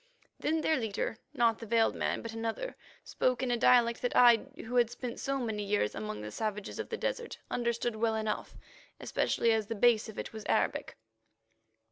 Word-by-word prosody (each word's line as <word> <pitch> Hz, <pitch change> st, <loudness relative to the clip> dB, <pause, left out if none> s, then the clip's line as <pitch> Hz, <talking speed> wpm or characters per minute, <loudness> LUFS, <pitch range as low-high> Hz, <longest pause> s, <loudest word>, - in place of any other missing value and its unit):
Then 315 Hz, +1 st, 0 dB
their 315 Hz, -, +2 dB
leader—not 230 Hz, +1 st, -1 dB
the 230 Hz, -, -8 dB
veiled 225 Hz, 0 st, +3 dB
man, -, -, -2 dB
but 230 Hz, -1 st, -6 dB
another—spoke 245 Hz, -, -3 dB
in 250 Hz, -, 0 dB
a -, -, +3 dB
dialect 235 Hz, -1 st, +4 dB
that 245 Hz, -, -1 dB
I, 240 Hz, -2 st, +6 dB, 0.2 s
who 245 Hz, +2 st, -2 dB
had 240 Hz, -2 st, +4 dB
spent 245 Hz, 0 st, -6 dB
so 275 Hz, 0 st, -1 dB
many 220 Hz, -5 st, -2 dB
years 200 Hz, -, 0 dB
among 105 Hz, -1 st, -5 dB
the 105 Hz, 0 st, -6 dB
savages 210 Hz, -, -4 dB
of -, -, -4 dB
the -, -, -3 dB
desert, 470 Hz, -1 st, -3 dB
understood 235 Hz, -1 st, -1 dB
well 225 Hz, 0 st, +1 dB
enough, 220 Hz, -1 st, -3 dB, 0.4 s
especially 230 Hz, -, +1 dB
as 220 Hz, -2 st, +1 dB
the 230 Hz, -, -3 dB
base 225 Hz, 0 st, +3 dB
of 215 Hz, -, -10 dB
it -, -, -5 dB
was 220 Hz, -1 st, -7 dB
Arabic. -, -, 0 dB
230 Hz, 180 wpm, -31 LUFS, 220-245 Hz, 0.4 s, I